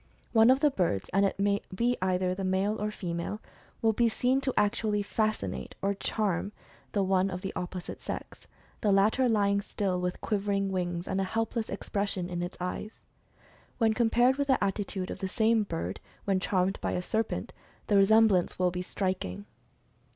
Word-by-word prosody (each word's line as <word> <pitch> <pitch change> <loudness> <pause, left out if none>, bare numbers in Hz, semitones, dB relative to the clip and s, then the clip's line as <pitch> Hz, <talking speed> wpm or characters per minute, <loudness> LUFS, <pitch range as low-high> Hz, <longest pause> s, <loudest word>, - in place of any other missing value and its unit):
One 225 0 +6
of 265 +1 +5
the 295 - +4
birds, 170 - 0
and 195 +1 +4
it - - -4
may 200 0 +1
be 240 +4 +2
either 185 0 +1
a 195 - -4
male 190 +3 0
or 210 - 0
female, 180 0 -4 0.4
will 225 0 +4
be 235 +2 +3
seen 255 +4 +1
to 265 -2 0
actually 210 0 +1
"fascinate" 200 - -2
or 200 +1 0
"charm" 200 -1 -1 0.4
the 200 - +2
one 190 0 +2
of 180 -1 -5
the 195 - -4
opposite 180 0 -5
sex, - - -7 0.3
the 210 - +2
latter 215 +6 +4
lying 200 -2 +2
still 195 -3 -2
with 180 0 -2
quivering 200 -2 0
wings, 175 -2 -2
and 195 0 0
a - - +1
helpless 225 +3 -2
expression 195 -2 -2
in 175 0 -2
its 175 +1 -5
eyes. 180 +4 -5 0.8
When 225 -2 +3
compared 240 +3 +3
with 280 -1 0
the 265 -5 +3
attitude 195 -1 -2
of - - -6
the 190 - -2
same 220 +3 +2
bird, 90 - -4 0.3
when 195 -2 +2
charmed 185 0 0
by - - -1
a 180 - -1
serpent, 220 +4 -2 0.3
the 205 - +1
resemblance 200 -2 +4
will 180 -1 +2
be 180 0 -3
striking. 180 - -3
200 Hz, 180 wpm, -29 LUFS, 185-220 Hz, 0.8 s, One